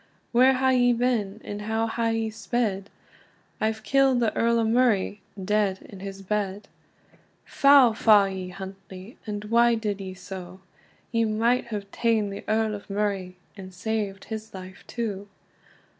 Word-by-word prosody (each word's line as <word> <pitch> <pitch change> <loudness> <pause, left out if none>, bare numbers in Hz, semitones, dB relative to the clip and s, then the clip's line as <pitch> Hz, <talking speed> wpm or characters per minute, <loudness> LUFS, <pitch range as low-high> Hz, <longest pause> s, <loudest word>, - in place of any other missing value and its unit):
"Where 255 +2 +5
hae 260 0 +2
ye 245 -1 +4
been? 230 -4 0
and 205 0 -6
how 220 +2 -1
hae 225 0 -1
ye 225 -1 -1
sped?" 215 -4 -2 0.7
"I've 220 0 -1
killed 270 +2 +3
the 230 -2 0
Earl 235 0 +2
o 230 - +2
Murray 220 -4 +2 0.2
dead 205 -2 +1
in 195 - -12
his 195 0 -8
bed." 205 0 -2 0.8
"Foul 275 -4 +6
fa 210 -3 +5
you, 185 -1 -6
Huntly! 190 +2 -10
and 210 0 -4
why 235 +2 +4
did 210 -3 -3
ye 190 -1 -7
so? 185 -1 -9 0.5
You 230 -1 +2
might 230 +4 +1
have 205 -3 -6
taen 220 -3 +1
the 200 - -7
Earl 220 0 +1
o 205 - -5
Murray, 195 -3 -2 0.2
and 190 -2 -10
saved 200 +1 -3
his 220 -2 -7
life 185 0 -10
too." 205 -4 -4
215 Hz, 155 wpm, -25 LUFS, 195-230 Hz, 0.8 s, Foul